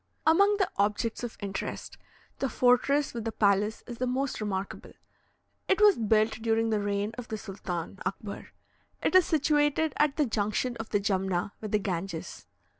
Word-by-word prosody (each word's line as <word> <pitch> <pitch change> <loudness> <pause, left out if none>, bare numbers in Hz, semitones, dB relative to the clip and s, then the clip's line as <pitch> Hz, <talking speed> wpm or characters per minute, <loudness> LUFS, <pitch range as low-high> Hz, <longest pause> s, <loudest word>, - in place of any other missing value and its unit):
Among 400 +6 +5
the 390 - +2
objects 210 +3 0
of 240 - -5
interest, 195 -1 -5 0.4
the 270 - 0
fortress 255 +4 +3
with 235 -2 -4
the 225 - -2
palace 205 +1 +1
is 240 -2 -8
the 255 - 0
most 260 -1 -1
remarkable. 195 -2 -4 0.7
It 385 - +2
was 415 -2 +7
built 220 0 +2
during 225 0 +1
the 215 - +2
reign 205 +1 -1
of 245 - -7
the 220 - -4
Sultan 190 -2 -6
Akbar. 200 +1 -5 0.6
It - - +1
is 370 -2 +6
situated 295 0 +2
at 295 -2 +2
the 300 - +3
junction 220 +2 -1
of 225 -1 -6
the 205 - +1
Jumna 190 -2 -1
with 215 -2 -5
the 210 - +4
Ganges. 190 -3 -5
225 Hz, 170 wpm, -28 LUFS, 200-275 Hz, 0.7 s, was